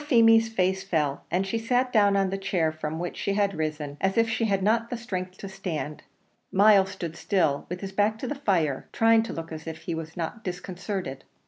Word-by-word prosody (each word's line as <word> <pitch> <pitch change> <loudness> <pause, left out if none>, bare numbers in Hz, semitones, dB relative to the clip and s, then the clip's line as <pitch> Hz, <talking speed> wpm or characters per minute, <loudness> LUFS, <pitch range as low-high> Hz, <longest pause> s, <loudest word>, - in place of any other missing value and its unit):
Poor 295 - -11
Feemy's 225 -4 +6
face 190 -3 +1
fell, 150 -7 -1
and 185 +2 +1
she 225 +4 -1
sat 250 +2 +1
down 205 -3 +5
on 195 -1 +1
the 195 - -1
chair 175 -4 0
from 155 0 -4
which 175 +1 -4
she 200 - -1
had 200 -1 +2
risen, 155 -3 -3
as 190 +2 +1
if 230 0 +4
she 225 0 0
had 195 -3 +1
not 230 +3 +2
strength 185 -5 -5
to 195 - -7
stand. 180 -6 -5 0.5
Myles 195 -1 +6
stood 170 -4 -6
still, 160 -8 0
with 180 +1 -5
his 195 -1 -5
back 210 +2 +1
to 255 - -5
the 290 - -1
fire, 175 - 0
trying 225 0 +4
to 225 - -5
look 165 0 -6
as 160 0 -7
if 160 0 -6
he 170 - -3
were 160 -1 -4
not 175 +6 -4
disconcerted. 180 -5 -5
190 Hz, 220 wpm, -26 LUFS, 165-220 Hz, 0.5 s, Feemy's